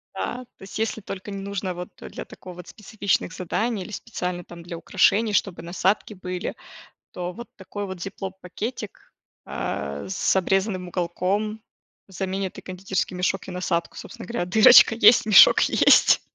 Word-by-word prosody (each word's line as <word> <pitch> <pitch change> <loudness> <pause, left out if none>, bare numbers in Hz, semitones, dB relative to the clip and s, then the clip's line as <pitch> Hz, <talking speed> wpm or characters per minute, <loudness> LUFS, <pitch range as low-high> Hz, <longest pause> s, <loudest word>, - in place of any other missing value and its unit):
Да. 250 +1 -4
То - - -15
есть, 195 - -8
если 225 0 -1
только 195 +1 -7
не 195 0 -5
нужно 195 -2 -4
вот 180 0 -7
для - - -8
такого 180 -1 -12
вот, 180 - -11
специфичных 200 -3 -2
заданий 205 +4 -2
или 195 - -10
специально, 180 -5 -5
там, 175 -1 -12
для 170 0 -7
украшений, 205 +5 +2
чтобы 195 -4 0
насадки 190 +5 0
были, 185 0 -5 0.6
то 180 0 -5
вот 235 +6 -10
такой 205 +1 -6
вот 190 -2 -7
зиплоп-пакетик, 195 +4 -6 0.6
э, 70 +1 -4
с 190 - +1
обрезанным 190 0 0
уголком 190 +5 -2 0.5
заменит 190 0 -4
и - - -8
кондитерский 185 0 -3
мешок, 185 +1 -1
и - - -4
насадку. 180 -2 -2
Собственно 235 - -9
говоря, 235 -6 -2
дырочка 220 +5 +7
есть, 230 0 +6
мешок 215 - +8
есть. - - +5
190 Hz, 155 wpm, -24 LUFS, 180-210 Hz, 0.6 s, мешок